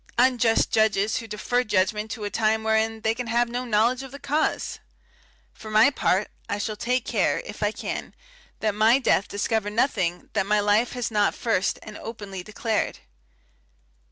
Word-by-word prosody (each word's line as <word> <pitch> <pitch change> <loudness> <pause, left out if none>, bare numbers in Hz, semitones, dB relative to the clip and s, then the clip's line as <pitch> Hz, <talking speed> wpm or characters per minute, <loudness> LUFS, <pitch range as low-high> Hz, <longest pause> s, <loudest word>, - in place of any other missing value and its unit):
Unjust 240 -2 +3
judges, 215 -1 +2
who 225 - -5
defer 245 +4 0
judgment 210 0 0
to 215 0 -6
a 205 - -2
time 220 0 +1
wherein 220 0 +1
they 220 +1 +1
can 245 +1 -5
have 235 +1 +2
no 245 +2 -4
knowledge 235 +3 +2
of 270 - -8
the 280 - -9
cause! 300 +2 -1 0.7
For 220 - -10
my 215 +6 +5
part, 200 -6 +1 0.2
I 205 - -1
shall 215 +1 -3
take 250 +3 -1
care, - - +1
if - - -9
I - - +2
can, - - -5 0.5
that 215 -1 +1
my 220 +4 +5
death 245 -6 +2
discover 205 +1 -1
nothing 205 -6 -1
that 195 - 0
my 210 0 +3
life 210 +3 +2
has 245 -2 -3
not 210 -1 +2
first 225 -5 0
and 215 -1 -9
openly 205 -4 -7
declared. 215 +3 -2
220 Hz, 175 wpm, -25 LUFS, 210-240 Hz, 0.7 s, my